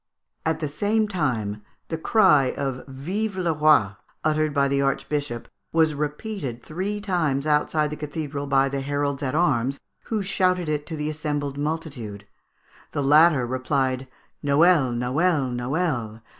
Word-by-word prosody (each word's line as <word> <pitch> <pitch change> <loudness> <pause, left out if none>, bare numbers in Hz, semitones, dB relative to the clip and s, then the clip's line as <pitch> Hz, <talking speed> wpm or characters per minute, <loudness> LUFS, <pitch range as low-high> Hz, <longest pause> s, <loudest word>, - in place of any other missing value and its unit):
At 160 - 0
the 155 - 0
same 210 +8 +1
time, 120 - -1 0.3
the 160 - -2
cry 155 - +4
of 135 -2 -3
"Vive 185 +10 -3
le 175 -3 +1
Roi!" 150 -10 +4 0.3
uttered 155 0 +1
by 140 -1 +2
the 140 0 +1
archbishop, 140 -2 -2 0.2
was 160 -1 +3
repeated 150 - -4
three 190 +6 -3
times 165 -9 0
outside 150 0 +1
the - - -3
cathedral 150 -1 -4
by 135 0 +3
the 135 0 -3
heralds 145 0 -1
at 135 0 -2
arms, 140 -5 +1 0.3
who 215 -3 -1
shouted 185 -2 +1
it 150 -1 -2
to 165 - -4
the 150 0 -2
assembled 145 -2 -3
multitude. 145 -10 -4 0.7
The 145 - -1
latter 150 -1 +5
replied, 130 +1 -1 0.4
"_Noel! 145 -3 +4
Noel! 135 +2 +1
Noel! 120 -4 -2
145 Hz, 145 wpm, -24 LUFS, 135-160 Hz, 0.7 s, latter